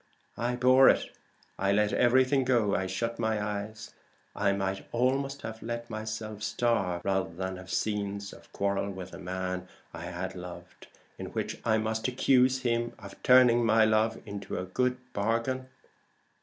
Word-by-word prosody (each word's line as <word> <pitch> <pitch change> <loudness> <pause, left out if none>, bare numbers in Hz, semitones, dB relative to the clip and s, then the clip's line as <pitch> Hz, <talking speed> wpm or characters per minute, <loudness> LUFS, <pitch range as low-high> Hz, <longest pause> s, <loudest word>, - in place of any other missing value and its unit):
I 120 +1 0
bore 130 +2 +6
it; - - +1 0.5
I 100 0 +2
let 105 +1 +2
everything 130 +2 +4
go; 120 -5 +2
I 95 - 0
shut 115 +5 -3
my 110 -2 0
eyes: 105 +2 -5 0.4
I 100 -1 +2
might 95 0 -2
almost 135 +3 0
have 110 0 -6
let 120 0 -5
myself 110 -1 -5
starve, 105 -6 0
rather 95 -2 +1
than 95 +2 -4
have 95 0 -11
scenes 100 -1 -2
of - - -16
quarrel 100 0 -1
with 95 -2 -7
the - - -9
man 90 0 -4 0.3
I 85 - -7
had 90 +1 -4
loved, 90 -1 -10 0.3
in - - -5
which - - -4
I 110 -1 +3
must 110 +1 -1
accuse 130 0 +3
him 120 -1 0
of 100 -3 -12
turning 125 -2 +6
my 110 0 +5
love 110 +1 +2
into 100 -1 -5
a 90 - -3
good 125 +7 0 0.2
bargain." 115 +5 -1
110 Hz, 160 wpm, -29 LUFS, 100-120 Hz, 0.5 s, bore